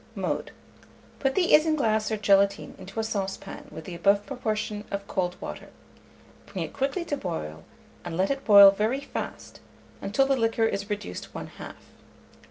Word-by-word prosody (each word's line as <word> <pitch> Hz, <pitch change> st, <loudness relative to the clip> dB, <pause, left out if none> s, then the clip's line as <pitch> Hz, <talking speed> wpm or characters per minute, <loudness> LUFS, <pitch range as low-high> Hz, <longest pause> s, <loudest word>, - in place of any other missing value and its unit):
Mode. -, -, -2 dB, 0.7 s
Put 270 Hz, -1 st, 0 dB
the 360 Hz, -2 st, +3 dB
isinglass 285 Hz, -9 st, +3 dB
or 220 Hz, -, -1 dB
gelatine 200 Hz, 0 st, +2 dB
into 195 Hz, +4 st, -7 dB
a -, -, +1 dB
saucepan 200 Hz, -3 st, -4 dB
with 160 Hz, -, -9 dB
the 180 Hz, -, -7 dB
above 200 Hz, +4 st, +2 dB
proportion 215 Hz, -5 st, -3 dB
of 200 Hz, 0 st, -4 dB
cold 180 Hz, -1 st, -2 dB
water; -, -, -7 dB, 0.8 s
bring -, -, -4 dB
it -, -, -11 dB
quickly 280 Hz, +6 st, -1 dB
to 290 Hz, -, -1 dB
boil, 120 Hz, -, -5 dB, 0.4 s
and 170 Hz, -1 st, -5 dB
let 190 Hz, +5 st, +2 dB
it 275 Hz, 0 st, -2 dB
boil 200 Hz, -2 st, +10 dB
very 220 Hz, +7 st, 0 dB
fast, 280 Hz, -, -6 dB, 0.4 s
until 225 Hz, +7 st, +2 dB
the 275 Hz, 0 st, +2 dB
liquor 225 Hz, -2 st, +1 dB
is 200 Hz, -1 st, -2 dB
reduced 200 Hz, -, -5 dB
one -, -, -5 dB
half. -, -, -10 dB
210 Hz, 165 wpm, -27 LUFS, 195-265 Hz, 0.8 s, boil